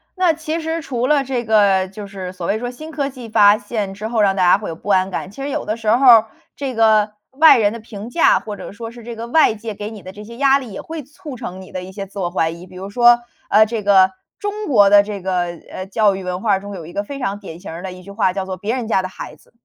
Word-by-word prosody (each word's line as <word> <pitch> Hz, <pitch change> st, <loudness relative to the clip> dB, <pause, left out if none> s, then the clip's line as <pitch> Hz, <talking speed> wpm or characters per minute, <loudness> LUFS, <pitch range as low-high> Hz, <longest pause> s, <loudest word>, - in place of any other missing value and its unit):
那 365 Hz, -3 st, +3 dB
其 315 Hz, +1 st, -4 dB
实 325 Hz, +1 st, -3 dB
除 250 Hz, -4 st, -2 dB
了 290 Hz, -1 st, +3 dB
这 255 Hz, -2 st, -2 dB
个 200 Hz, -4 st, +3 dB
就 200 Hz, +2 st, -9 dB
是 190 Hz, -2 st, -7 dB
所 180 Hz, -2 st, -6 dB
谓 215 Hz, +5 st, 0 dB
说 245 Hz, -, -4 dB
新 310 Hz, +6 st, -9 dB
科 285 Hz, -3 st, -2 dB
技 250 Hz, -4 st, -10 dB
发 210 Hz, -1 st, +6 dB
现 205 Hz, -2 st, -4 dB
之 210 Hz, +2 st, -6 dB
后， 225 Hz, -1 st, 0 dB
让 195 Hz, -1 st, +3 dB
大 185 Hz, -, +1 dB
家 180 Hz, +1 st, +6 dB
会 205 Hz, -, -6 dB
有 165 Hz, -, -5 dB
不 185 Hz, -, -9 dB
安 190 Hz, -1 st, +3 dB
感。 185 Hz, 0 st, -5 dB
其 240 Hz, -, -10 dB
实 280 Hz, -, -3 dB
有 -, -, -3 dB
的 215 Hz, -, -1 dB
时 225 Hz, -2 st, -3 dB
候 245 Hz, +5 st, +3 dB
儿， 225 Hz, -3 st, +8 dB, 0.3 s
这 270 Hz, -3 st, -4 dB
个 215 Hz, -2 st, +3 dB, 0.2 s
外 300 Hz, +3 st, +7 dB
人 210 Hz, -1 st, +2 dB
的 230 Hz, -, -7 dB
评 215 Hz, 0 st, -9 dB
价， 330 Hz, -, +4 dB
或 210 Hz, -2 st, -7 dB
者 -, -, -9 dB
说 225 Hz, +2 st, -8 dB
是 235 Hz, 0 st, -13 dB
这 235 Hz, +1 st, -7 dB
个 230 Hz, +1 st, -6 dB
外 250 Hz, -3 st, +4 dB
界 220 Hz, 0 st, -6 dB
给 205 Hz, +1 st, -6 dB
你 215 Hz, -3 st, -11 dB
的 185 Hz, -, -8 dB
这 210 Hz, +2 st, -11 dB
些 235 Hz, +2 st, -11 dB
压 275 Hz, 0 st, +4 dB
力， 245 Hz, -6 st, -9 dB
也 -, -, -6 dB
会 320 Hz, -1 st, -7 dB
促 290 Hz, 0 st, -10 dB
成 190 Hz, -6 st, -7 dB
你 185 Hz, -, -13 dB
的 185 Hz, -, -5 dB
一 185 Hz, -, -9 dB
些 195 Hz, 0 st, -6 dB
自 200 Hz, +1 st, -10 dB
我 175 Hz, -2 st, -1 dB
怀 165 Hz, -2 st, 0 dB
疑。 170 Hz, +2 st, -11 dB
比 185 Hz, -, -15 dB
如 190 Hz, +2 st, -7 dB
说， 240 Hz, +1 st, +5 dB, 0.3 s
呃， 215 Hz, +1 st, +6 dB
这 220 Hz, 0 st, -3 dB
个 190 Hz, -2 st, +5 dB, 0.3 s
中 415 Hz, +1 st, -4 dB
国 205 Hz, -8 st, +5 dB
的 205 Hz, 0 st, +8 dB
这 205 Hz, 0 st, -5 dB
个， 180 Hz, -2 st, 0 dB, 0.3 s
呃， 185 Hz, +1 st, -6 dB
教 205 Hz, 0 st, +2 dB
育 190 Hz, -, -6 dB
文 180 Hz, 0 st, -4 dB
化 200 Hz, -3 st, +2 dB
中 200 Hz, 0 st, -8 dB
有 170 Hz, -4 st, -8 dB
一 175 Hz, -, -11 dB
个 200 Hz, -, -2 dB
非 280 Hz, +7 st, -7 dB
常 205 Hz, -6 st, -3 dB
典 175 Hz, -5 st, -10 dB
型 190 Hz, -, -9 dB
儿 165 Hz, -, -7 dB
的 190 Hz, 0 st, -6 dB
一 185 Hz, 0 st, -11 dB
句 200 Hz, -, -11 dB
话 200 Hz, -2 st, +1 dB
叫 190 Hz, 0 st, -3 dB
作 190 Hz, 0 st, -4 dB
“别 205 Hz, +6 st, -3 dB
人 245 Hz, -4 st, -4 dB
家 195 Hz, -, +2 dB
的 185 Hz, -, -4 dB
孩 155 Hz, -, -9 dB
子”。 -, -, -26 dB
210 Hz, 320 characters per minute, -19 LUFS, 190-240 Hz, 0.3 s, 儿